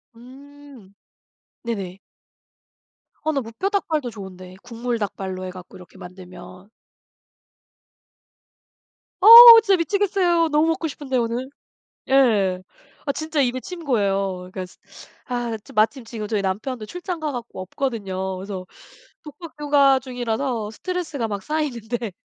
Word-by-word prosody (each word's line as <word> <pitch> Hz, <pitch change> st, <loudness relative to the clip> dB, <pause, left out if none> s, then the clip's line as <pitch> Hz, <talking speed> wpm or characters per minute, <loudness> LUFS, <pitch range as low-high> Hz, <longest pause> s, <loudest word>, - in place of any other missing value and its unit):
음 265 Hz, -3 st, -16 dB, 0.7 s
네네. 195 Hz, -6 st, -5 dB, 1.2 s
아 315 Hz, -, 0 dB
나 280 Hz, -3 st, -1 dB
무뼈 230 Hz, -, -4 dB
닭발도 315 Hz, -10 st, -1 dB
좋은데 185 Hz, -4 st, -11 dB
국물 240 Hz, 0 st, -4 dB
닭발로 190 Hz, -2 st, -5 dB
해 -, -, -5 dB
갖고 180 Hz, 0 st, -12 dB
이렇게 180 Hz, -, -16 dB
만들면 180 Hz, +1 st, -12 dB, 2.5 s
어 395 Hz, -, +3 dB, 0.4 s
진짜 390 Hz, -4 st, +3 dB
미치겠어요. 350 Hz, -2 st, +1 dB
너무 300 Hz, +1 st, +2 dB
먹고 325 Hz, 0 st, -1 dB
싶은데, 275 Hz, -3 st, -4 dB
오늘. 240 Hz, +2 st, -2 dB, 0.6 s
예. 210 Hz, -9 st, +3 dB, 0.4 s
아 280 Hz, -, 0 dB
진짜 315 Hz, +1 st, -3 dB
입에 255 Hz, 0 st, -1 dB
침 350 Hz, -3 st, -9 dB
고여요. 195 Hz, -7 st, -1 dB
그러니까 185 Hz, -1 st, -5 dB, 0.6 s
아 240 Hz, -2 st, -3 dB
차 205 Hz, -, -17 dB
마침 220 Hz, +5 st, +1 dB
지금 225 Hz, -2 st, -7 dB
저희 210 Hz, -1 st, -1 dB
남편도 215 Hz, +5 st, -4 dB
출장 355 Hz, -, -6 dB
가 305 Hz, -1 st, -2 dB
갖고 240 Hz, -7 st, -7 dB
없거든요. 190 Hz, -3 st, -4 dB
그래서 190 Hz, 0 st, -7 dB, 0.6 s
독박 305 Hz, +2 st, -11 dB
육아 280 Hz, -2 st, +4 dB
중이라서 245 Hz, -3 st, -3 dB
스트레스가 320 Hz, -, -4 dB
막 200 Hz, -2 st, -5 dB
쌓이는데 240 Hz, -7 st, -3 dB
240 Hz, 265 characters per minute, -22 LUFS, 195-290 Hz, 2.5 s, 육아